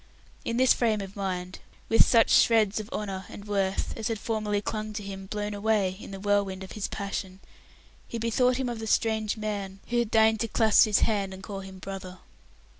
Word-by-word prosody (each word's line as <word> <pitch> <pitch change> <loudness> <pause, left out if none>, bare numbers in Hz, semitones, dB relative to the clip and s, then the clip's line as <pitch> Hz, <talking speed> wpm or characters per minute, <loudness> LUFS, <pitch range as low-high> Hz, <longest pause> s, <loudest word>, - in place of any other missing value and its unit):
In 230 - -2
this 260 0 +6
frame 225 -3 +1
of 195 0 -8
mind, 185 -2 -4 0.3
with 225 - +6
such 230 -2 +4
shreds 220 -3 +4
of 215 0 -7
honour 195 -3 -4
and 200 - -10
worth 195 -2 -1
as 220 - -3
had 225 - -1
formerly 210 -1 -1
clung 215 +1 -4
to 210 -1 -5
him 195 -1 -7
blown 210 +1 -3
away 205 -2 +1
in - - -9
the 195 -1 -7
whirlwind 200 -1 0
of 190 - -10
his 210 - -3
passion, 195 -1 -5 0.7
he 235 - -5
bethought 245 +2 +2
him 260 -1 -1
of 240 -2 -4
the 220 - -5
strange 220 0 +1
man 200 -3 -4
who 240 0 +1
had 235 -2 0
deigned 220 -1 +4
to 230 - 0
clasp 220 -1 +5
his 210 -2 +2
hand 200 -3 0
and 190 - -12
call 200 -2 -6
him 190 -1 -9
"brother". 190 -1 -7
210 Hz, 205 wpm, -27 LUFS, 195-220 Hz, 0.7 s, this